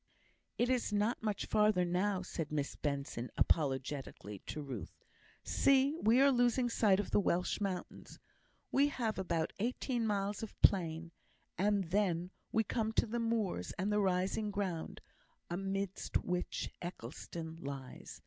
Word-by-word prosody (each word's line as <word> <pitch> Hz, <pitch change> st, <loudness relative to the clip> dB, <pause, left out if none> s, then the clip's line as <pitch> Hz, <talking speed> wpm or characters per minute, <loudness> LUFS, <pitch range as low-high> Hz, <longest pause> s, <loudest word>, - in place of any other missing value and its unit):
"It 240 Hz, -, +3 dB
is 250 Hz, -3 st, +1 dB
not 210 Hz, +3 st, +1 dB
much 210 Hz, -3 st, -1 dB
further 210 Hz, -4 st, +3 dB
now," 185 Hz, +2 st, +1 dB
said 165 Hz, -4 st, -4 dB
Miss 145 Hz, -2 st, -1 dB
Benson, 140 Hz, -4 st, -3 dB
apologetically, 135 Hz, -, 0 dB
to -, -, -4 dB
Ruth. 125 Hz, -, -7 dB, 0.4 s
"See! 275 Hz, +2 st, +4 dB
we 230 Hz, +4 st, +5 dB
are 275 Hz, +1 st, +7 dB
losing 245 Hz, 0 st, +3 dB
sight 205 Hz, -4 st, +4 dB
of 205 Hz, -, -2 dB
the -, -, +4 dB
Welsh 180 Hz, 0 st, +1 dB
mountains. 190 Hz, -3 st, -4 dB, 0.5 s
We 280 Hz, +1 st, +5 dB
have 235 Hz, -6 st, -2 dB
about 170 Hz, -4 st, -1 dB
eighteen 240 Hz, +1 st, 0 dB
miles 200 Hz, -1 st, -1 dB
of 225 Hz, -, -7 dB
plain, 170 Hz, -3 st, +3 dB, 0.4 s
and 195 Hz, -2 st, +1 dB
then 180 Hz, -3 st, +1 dB, 0.2 s
we 220 Hz, -, +3 dB
come 220 Hz, 0 st, -1 dB
to -, -, +3 dB
the 235 Hz, +2 st, -2 dB
moors 220 Hz, -, -1 dB
and 195 Hz, +3 st, 0 dB
the 210 Hz, -, +3 dB
rising 195 Hz, +2 st, +1 dB
ground, 195 Hz, -5 st, -3 dB, 0.5 s
amidst 195 Hz, +1 st, -1 dB
which 180 Hz, 0 st, -2 dB
Eccleston 160 Hz, +1 st, -6 dB
lies. 140 Hz, -4 st, -7 dB
195 Hz, 140 wpm, -35 LUFS, 165-220 Hz, 0.5 s, are